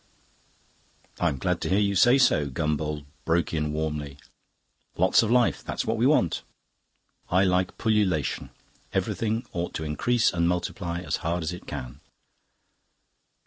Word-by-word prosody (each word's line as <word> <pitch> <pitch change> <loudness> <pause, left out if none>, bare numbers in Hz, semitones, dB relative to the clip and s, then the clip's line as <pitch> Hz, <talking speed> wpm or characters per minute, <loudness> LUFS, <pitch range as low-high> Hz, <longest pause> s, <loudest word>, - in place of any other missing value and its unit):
"I'm 80 -6 +1
glad 65 - -1
to - - -2
hear 95 - +3
you 100 -1 +2
say 120 +8 +6
so," 75 - +3
Gombauld 75 +1 -2 0.2
broke 85 +1 0
in 75 -1 -1
warmly. 75 -2 -3 0.8
"Lots - - +5
of 115 - -1
life: 120 0 +2
that's - - -3
what 110 - 0
we 115 +3 +3
want. 135 - +2 0.9
I 90 +2 +4
like 90 -1 +1
pullulation; 100 - 0 0.4
everything 115 +1 -1
ought 85 0 -3
to 80 - -3
increase 110 +11 +1
and 85 -1 +1
multiply 85 0 -2
as 90 - -2
hard 85 +1 -2
as 80 +3 -2
it 90 - -10
can." - - -6
85 Hz, 145 wpm, -26 LUFS, 75-105 Hz, 0.9 s, say